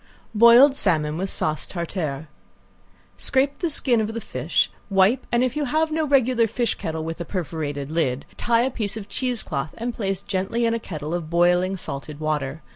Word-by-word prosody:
~BOILED 235 +5 +7
SALMON 155 - +2
WITH 190 +1 -2
SAUCE 155 -4 -2
TARTARE~ 160 -4 -4 0.9
Scrape 275 +1 +1
the 340 - 0
skin 245 -6 +2
of 220 +1 -3
the - - -2
fish, 220 - 0 0.2
wipe, 195 +5 +3
and 240 +1 +3
if 255 +1 -1
you 300 -1 0
have 315 +4 +1
no 315 0 0
regular 255 -4 +3
fish 235 +2 -1
kettle 160 -1 -4
with 165 +2 -5
a - - -1
perforated 150 -5 -4
lid, 140 -5 -1
tie 230 -1 +2
in 250 - +2
a - - -12
piece 215 -4 -4
of 205 -2 -7
cheesecloth 235 - -2
and 235 +1 -3
place 195 -3 -3
gently 200 +5 -1
in 230 - +2
a 230 - -1
kettle 155 -6 -6
of 170 -3 -3
boiling 175 +2 +2
salted 145 -2 -6
water. 155 -1 -2
195 Hz, 190 wpm, -23 LUFS, 160-240 Hz, 0.9 s, ~BOILED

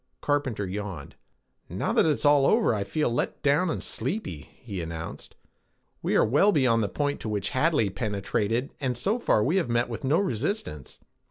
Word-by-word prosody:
Carpenter 140 -8 -1
yawned. 95 -6 -6 0.6
"Now - - -2
that - - +4
it's 150 -1 0
all 145 -1 +5
over, 220 - +3
I 105 -2 -1
feel 150 +3 -1
let 120 - -2
down 145 +6 +3
and - - -3
sleepy," 85 - -3
he 100 -6 -6
announced. 80 0 -7 0.7
"We - - 0
are - - +5
well 150 - +4
beyond 125 - +3
the 105 - -1
point 145 -1 -1
to 110 - -5
which 105 -2 -1
Hadley 130 - +2
penetrated 105 +4 -2
and 130 -4 -1
so 205 - 0
far 110 - +2
we 160 - +1
have 170 -10 0
met 120 +1 +1
with 115 -3 -6
no 140 +4 +3
resistance. 130 - -3
120 Hz, 180 wpm, -26 LUFS, 105-150 Hz, 0.7 s, all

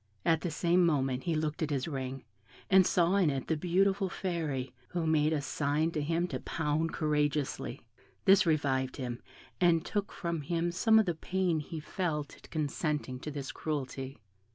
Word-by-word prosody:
At 160 -1 +3
the 175 - -2
same 175 +3 +3
moment 135 -6 +1
he 170 -2 +1
looked 155 0 -2
at 160 - 0
his 140 -1 -1
ring, 135 -3 -4 0.5
and 190 -1 +7
saw 175 +2 +3
in 185 -6 +4
it 135 -2 -2
the 160 - +1
beautiful 190 +4 +2
Fairy, 155 -9 -3
who 175 -2 -2
made 155 -1 +3
a 155 -2 +1
sign 145 +3 0
to 155 - -2
him 165 +4 0
to - - -3
pound 160 0 -1
courageously; 150 -2 -1 0.4
this 195 -1 +7
revived 140 -5 +1
him, 125 -3 -4 0.4
and 170 -2 +4
took 205 -2 -2
from 170 -3 -3
him 170 +3 -1
some 220 +6 +4
of 220 - +5
the 175 - 0
pain 180 0 0
he 155 +2 -6
felt 150 -3 -3
at - - -17
consenting 150 -3 -2
to 150 - -6
this 140 -2 -5
cruelty. 135 -3 -4
155 Hz, 175 wpm, -31 LUFS, 145-175 Hz, 0.5 s, and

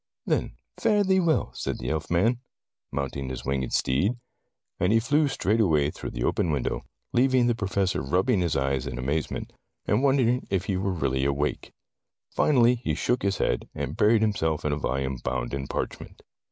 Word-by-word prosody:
"Then - - -1 0.2
fare 210 -1 +3
thee 190 -1 +3
well," 165 -4 +1
said - - -3
the - - -4
elfman, 85 +9 +1 0.5
mounting 70 -1 -3
his 65 -1 -6
winged 65 -1 -1
steed. 75 - +1 0.7
And 90 +3 +2
he 115 - +5
flew 145 +6 +2
straightway 95 - +2
through - - -6
the - - -4
open 85 - +1
window, 65 -4 -2 0.3
leav 130 +2 +4
ing 125 -2 +4
the 120 - +3
Professor 100 -4 -1
rubbing 95 - +1
his 85 -3 0
eyes 70 0 0
in 65 - -5
amaze 70 +5 -1
ment, - - -6 0.3
and 105 +4 +2
wondering 130 -3 +2
if 95 -1 0
he 100 - -1
were 95 +1 -1
really 65 -7 0
awake. 70 +2 -1 0.6
Finally 125 -4 +4
he 120 - -2
shook 125 0 0
his 100 0 0
head, - - -1
and 70 +1 -4
buried 110 +1 +4
himself 80 -9 0
in 75 - +1
a - - +1
volume 65 -2 -2
bound 60 0 -3
in 70 -1 -3
parchment. - - -5
90 Hz, 180 wpm, -26 LUFS, -, 0.7 s, he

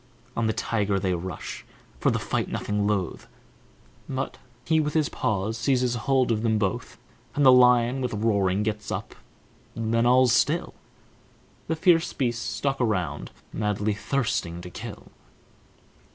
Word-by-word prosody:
On 115 -1 +1
the - - +2
tiger 105 -4 0
they 95 -1 0
rush, 90 -1 -5 0.4
for - - +3
the - - +1
fight - - -2
nothing 105 0 -1
loth, 100 -5 -2 0.8
But 135 0 -3 0.3
he 160 -1 +3
with 150 0 -1
his 155 -2 +2
paws 110 +2 -1
seizes 125 0 +2
hold 125 +1 +1
of 110 -1 +1
them 110 -1 +2
both 95 -4 -2 0.4
And 145 - +3
the 130 - +9
lion, 125 0 +5
with 125 -3 -2
roaring, 100 -2 +1
gets 105 -1 -3
up, - - -4 0.6
then 115 +1 +1
all's 125 -1 +5
still, - - +1 0.9
The 160 - 0
fierce 165 0 +3
beasts 120 -3 -1
stalk 135 -1 -2
around, 110 -7 -1 0.2
madly 105 0 0
thirsting 100 -6 -1
to 90 - -9
kill. - - -9
115 Hz, 145 wpm, -26 LUFS, 105-130 Hz, 0.9 s, the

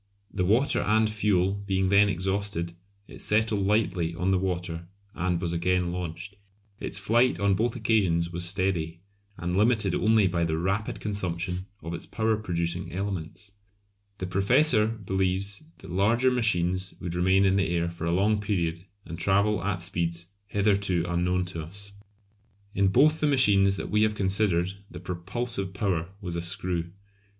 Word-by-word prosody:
The 95 - 0
water 115 +9 +2
and 110 +1 +3
fuel 100 -3 +1
being 95 -1 +1
then 100 +1 +5
exhausted 95 -2 -2 0.3
it - - -11
settled 105 -2 +1
lightly 90 -6 +1
on 90 +2 0
the 95 - +2
water 90 -2 -3 0.3
and 90 -1 -1
was 85 -1 -2
again 90 +1 +1
launched. 90 +2 -5 0.5
Its - - -3
flight 120 +5 +2
on 100 -1 +3
both 115 +5 0
occasions 95 -8 +1
was 85 0 -2
steady, 85 -2 -1 0.4
and 90 +1 -2
limited 105 -2 +2
only 110 0 +3
by 90 -2 +1
the 80 -1 0
rapid 95 +5 -1
consumption 95 -2 -3 0.2
of 85 +1 -5
its 85 - -6
power 110 0 0
producing 85 -3 -2
elements. 95 0 -5 0.7
The 95 - -4
Professor 105 +5 +3
believes 100 - -1
that 95 - -11
larger 115 +8 +3
machines 95 -6 0
would 90 -2 -4
remain 95 +2 +3
in 95 0 +3
the 95 -2 +1
air 85 0 0
for 85 -1 -6
a 85 - 0
long 105 +4 +2
period 85 -5 -1 0.2
and 85 0 -7
travel 100 +1 +2
at 95 -2 -2
speeds 85 +1 -2 0.2
hitherto 100 -4 +1
unknown 90 +1 0
to 80 - -4
us. 100 +6 -8 0.8
In 100 0 +2
both 150 +10 +4
the 150 - +2
machines 100 -8 +4
that - - -5
we 105 0 +3
have 110 0 +2
considered 95 -2 +1 0.2
the 90 - -9
propulsive 95 +3 -4
power 90 -5 -1
was 90 -4 -5
a 85 - -2
screw. 90 -1 -2
95 Hz, 160 wpm, -27 LUFS, 85-105 Hz, 0.8 s, then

